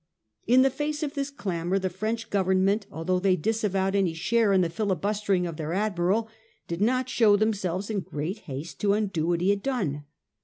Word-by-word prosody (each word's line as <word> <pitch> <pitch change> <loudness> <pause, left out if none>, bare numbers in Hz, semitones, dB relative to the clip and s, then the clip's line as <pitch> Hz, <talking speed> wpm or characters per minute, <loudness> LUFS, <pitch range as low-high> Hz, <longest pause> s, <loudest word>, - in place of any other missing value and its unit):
In 255 +3 +6
the 270 - +3
face 295 +3 -3
of 290 -1 -3
this 280 -2 -2
clamour 185 -8 -2
the 190 -1 -1
French 220 +5 -3
Government, 195 +1 +2
although 180 +3 -1
they 190 0 +3
disavowed 195 0 0
any 185 -5 +1
share 215 +5 +2
in 190 -1 +4
the 170 - +1
filibustering 200 0 0
of 165 -3 -5
their 160 +1 -3
admiral, 200 +2 +1 0.4
did 170 +2 -4
not 255 +3 +2
show 225 -5 +4
them 215 +2 +2
selves 190 +1 -3
in 210 - 0
great 175 +4 -4
haste 140 +1 -6
to 200 -1 +3
undo 190 -7 -1
what 170 -1 +1
he 190 +3 +3
had 200 0 -1
done. 170 - -2
195 Hz, 195 wpm, -26 LUFS, 175-220 Hz, 0.4 s, In